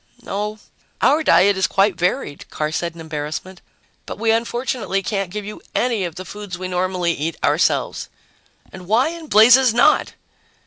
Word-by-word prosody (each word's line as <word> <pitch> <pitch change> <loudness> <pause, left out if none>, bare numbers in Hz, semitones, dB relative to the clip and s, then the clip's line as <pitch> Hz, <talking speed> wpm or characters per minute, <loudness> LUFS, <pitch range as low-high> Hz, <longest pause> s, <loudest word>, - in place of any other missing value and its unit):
"No, 210 +2 -4 0.4
our 305 +3 +3
diet 200 - +4
is 190 - +2
quite 195 +1 +2
varied," 175 - -2
Carr 150 0 -3
said 170 +1 -3
in 165 - -10
embarrassment. 155 +4 -6 0.5
"But - - -6
we 225 +1 +1
unfortunately 230 -3 -1
can't 195 -3 -2
give 210 +2 -6
you 210 - -8
any 235 -6 0
of 170 -2 -6
the 185 - -8
foods 205 -3 -8
we 185 0 -5
normally 180 -1 -1
eat 160 +2 -4
ourselves." - - +1 0.6
"And 185 -2 -11
why 235 +8 +3
in 335 -1 -8
blazes 240 +1 +6
not?" 245 - +3
195 Hz, 165 wpm, -20 LUFS, 180-225 Hz, 0.6 s, blazes